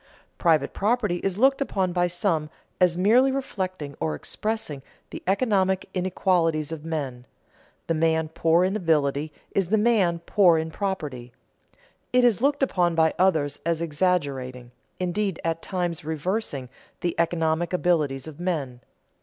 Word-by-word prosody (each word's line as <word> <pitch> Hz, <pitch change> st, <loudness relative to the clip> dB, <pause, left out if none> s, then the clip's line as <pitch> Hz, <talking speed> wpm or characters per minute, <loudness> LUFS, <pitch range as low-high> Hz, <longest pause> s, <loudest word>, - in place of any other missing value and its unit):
Private 160 Hz, -5 st, +2 dB
property 210 Hz, -4 st, +1 dB
is 190 Hz, +1 st, -2 dB
looked 270 Hz, +4 st, +3 dB
upon 190 Hz, -9 st, 0 dB
by 175 Hz, 0 st, +2 dB
some 175 Hz, -4 st, -1 dB, 0.3 s
as 180 Hz, -2 st, +3 dB
merely 235 Hz, +8 st, +4 dB
reflecting 185 Hz, -, -4 dB
or 80 Hz, -1 st, -1 dB
expressing 210 Hz, -, -4 dB, 0.3 s
the -, -, -7 dB
economic 190 Hz, -3 st, +1 dB
inequalities 175 Hz, -4 st, +1 dB
of 160 Hz, -2 st, -6 dB
men; 135 Hz, -7 st, -4 dB, 0.6 s
the 165 Hz, -, 0 dB
man 160 Hz, 0 st, +1 dB
poor 165 Hz, +2 st, +2 dB
in 190 Hz, +2 st, 0 dB
ability 155 Hz, -5 st, +1 dB, 0.2 s
is 195 Hz, -3 st, 0 dB
the 220 Hz, +5 st, +2 dB
man 210 Hz, -6 st, +3 dB
poor 180 Hz, -5 st, +5 dB
in 160 Hz, 0 st, -2 dB
property. 150 Hz, -, -4 dB, 0.8 s
It 250 Hz, 0 st, +4 dB
is 230 Hz, -3 st, +3 dB
looked 285 Hz, +1 st, +2 dB
upon 175 Hz, -9 st, +1 dB
by 160 Hz, -1 st, +3 dB
others 160 Hz, -6 st, +2 dB
as 165 Hz, -1 st, 0 dB
exaggerating, 145 Hz, -7 st, -1 dB, 0.3 s
indeed 185 Hz, +1 st, -1 dB
at 165 Hz, 0 st, -1 dB
times 175 Hz, -4 st, -3 dB
reversing, 155 Hz, -, -3 dB, 0.3 s
the 175 Hz, -, 0 dB
economic 165 Hz, 0 st, +1 dB
abilities 155 Hz, -7 st, +1 dB
of 155 Hz, 0 st, -10 dB
men. 150 Hz, -9 st, -2 dB
175 Hz, 140 wpm, -25 LUFS, 155-190 Hz, 0.8 s, poor